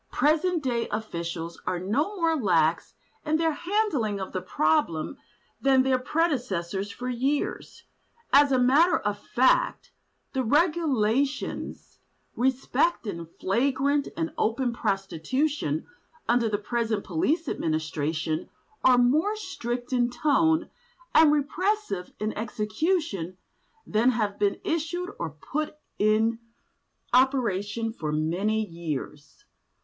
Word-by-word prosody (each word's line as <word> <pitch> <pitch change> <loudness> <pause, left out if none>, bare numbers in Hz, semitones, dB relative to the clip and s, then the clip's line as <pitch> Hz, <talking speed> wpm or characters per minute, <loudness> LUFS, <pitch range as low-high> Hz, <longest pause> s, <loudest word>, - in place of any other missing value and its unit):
Present 320 +2 +2
day 240 -3 0
public - - -9
officials 170 -2 -5
are 185 0 0
no 255 - -1
more 330 -3 +2
lax 170 - +1 0.3
in 315 0 +1
their 325 0 +2
handling 315 - 0
of 190 - -5
the 185 - -3
problem 160 - 0 0.4
than 265 -1 +4
their 260 -1 +2
predecessors 235 - -1
for 250 +4 -6
years; 260 +4 -2 0.5
as 285 0 +6
a 260 - +4
matter 295 +8 +5
of 205 0 -2
fact, 260 - +2 0.4
the 265 -1 0
regulations 285 -3 0 0.4
respecting 250 - 0
flagrant 270 +7 +1
and 165 0 -2
open 235 +2 +1
prostitution 195 - -1 0.4
under 235 -1 +3
the 205 - 0
present 220 0 -1
police 290 - 0
administration, 155 - -2 0.3
are 255 -1 +6
more 300 - +3
strict 250 - -4
in 245 -1 +2
tone, 315 +5 +2 0.5
and 315 -2 +7
repressive 300 - -1
in 215 +1 -2
execution 215 - -1 0.5
than 220 +4 +3
have 215 -5 -1
been 200 -1 +1
issued 345 +4 -2
or - - -2
put 295 - -4 0.2
in 220 +2 +2 0.7
operation 230 -4 +2
for 155 -9 -4
many 185 +8 0
years. 155 -4 -6
240 Hz, 115 wpm, -26 LUFS, 195-295 Hz, 0.7 s, and